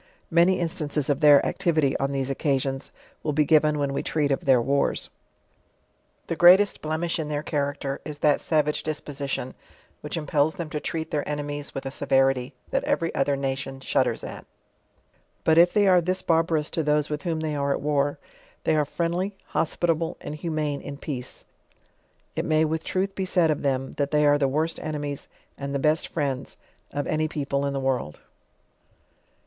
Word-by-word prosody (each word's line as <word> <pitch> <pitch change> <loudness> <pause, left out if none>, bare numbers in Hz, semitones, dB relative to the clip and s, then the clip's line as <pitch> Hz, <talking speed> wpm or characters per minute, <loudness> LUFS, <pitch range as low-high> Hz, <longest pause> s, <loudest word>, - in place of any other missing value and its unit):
Many 170 +3 +4
instances 150 -4 -1
of 140 - 0
their 145 -3 +7
activity, 155 -5 +1
on 135 0 0
these 135 -1 -1
occasions, 135 -1 -1 0.3
will 150 - -1
be 150 +1 +3
given 155 0 +4
when 140 -1 -1
we - - -1
treat 150 -3 0
of 135 - -1
their 130 -3 +5
wars. 140 +4 0 1.1
The 165 - -3
greatest 180 +5 +6
blemish 160 +2 -1
in 155 - -2
their 150 0 -2
character, 140 -2 -2
ig 150 - -6
that 150 -2 +4
eavage 150 -2 +1
disposition, 145 -4 -4 0.5
which 150 +3 -5
impels 150 0 +1
them 170 -5 -5
to 150 - -2
treat 160 +1 -4
their 150 -1 -2
enemies 145 -1 -4
with 135 - -4
a 135 - -3
severity, 135 -1 +1 0.2
that - - +1
every 165 - 0
other 140 0 +1
nation 135 0 -3
ehudders 135 - 0
at; - - -9 1.0
but 160 0 +5
if 175 +1 +6
they 205 -1 +3
are 180 -2 +6
th 185 +2 -1
IB - - -32
barbarous 160 -2 +1
to 165 - 0
those 150 0 +1
with 150 -1 -2
whom 165 -1 -2
they 155 -1 -2
are 140 -1 0
at - - 0
war, 145 -1 0 0.5
they - - +2
are 150 -1 +2
friendly, 175 +6 -2
hospitable 165 +1 0
and - - -6
humane 150 -2 -2
in 140 - -7
peace. 130 -4 -6 0.9
It - - -1
may 155 0 +3
with 160 +1 -2
truth 195 +1 -1
be 190 - -2
siid 175 -4 +3
of 150 - -2
them, 135 -2 -1
that 140 -1 0
they 150 0 +3
are 145 0 +4
the 140 - +3
worst 155 +5 -1
enemies, 145 -2 -4 0.3
and 140 0 -4
the - - +3
best 155 +3 +1
friends 140 -4 -3 0.3
of 145 0 -3
any 155 0 0
peopte 140 -3 -2
ia 140 - 0
the 140 0 -2
world. 130 - -2
150 Hz, 185 wpm, -25 LUFS, 140-160 Hz, 1.1 s, their